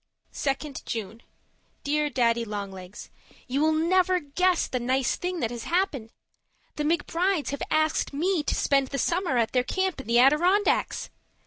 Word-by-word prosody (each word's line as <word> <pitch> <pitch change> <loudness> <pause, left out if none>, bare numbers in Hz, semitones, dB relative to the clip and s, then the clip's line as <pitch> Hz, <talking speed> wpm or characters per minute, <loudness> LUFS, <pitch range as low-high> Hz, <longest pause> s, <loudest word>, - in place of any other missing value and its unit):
Judy 280 +2 -2
2nd 270 - -9
June 225 0 -5 0.6
Dear 300 +1 0
Daddy 235 -3 +1
Long 205 -3 -5
Legs, 185 +1 -10 0.4
You 265 +3 -1
will 315 +1 +4
never 360 +3 +2
guess 355 +4 +1
the 255 - -3
nice 255 +1 0
thing 360 -2 -3
that 230 - -1
has 240 -1 -6
happened. 335 - -1 0.7
The 300 - -2
McBrides 340 +2 0
have 280 - -4
asked 310 0 +1
me 335 +4 0
to - - -1
spend 275 -1 +2
the 275 - -4
summer 340 -2 0
at 230 -2 +1
their 250 -1 +2
camp 375 0 -1
in - - -15
the 235 +1 +3
Adirondacks! 340 +11 +3
290 Hz, 165 wpm, -26 LUFS, 245-345 Hz, 0.7 s, will